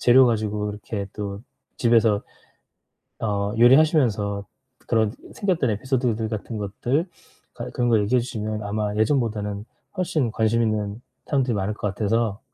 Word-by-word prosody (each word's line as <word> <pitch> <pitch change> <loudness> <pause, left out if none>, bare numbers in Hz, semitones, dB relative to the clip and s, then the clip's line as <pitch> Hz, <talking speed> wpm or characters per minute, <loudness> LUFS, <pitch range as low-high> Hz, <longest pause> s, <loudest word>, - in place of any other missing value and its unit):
재료 130 +1 +7
가지고 105 -2 0
이렇게 105 0 -5
또 100 -1 -5 0.4
집에서 115 -3 +3 1.0
어 100 -1 -1
요리하시면서 120 - +4 0.4
그런 110 -2 +2 0.2
생겼던 180 - 0
에피소드들 120 -1 0
같은 110 +1 -4
것들 120 - -1 0.5
갈 - - -6
그런 120 -1 0
거 115 - +5
얘기해 115 +5 +2
주시면 110 -3 -4
아마 105 0 -2
예전보다는 105 -4 0 0.3
훨씬 155 -9 0
관심있는 110 -1 0 0.3
사람들이 130 -4 +1
많을 100 +1 -1
것 105 - -2
같아서 110 -1 0
110 Hz, 315 characters per minute, -24 LUFS, 105-120 Hz, 1.0 s, 재료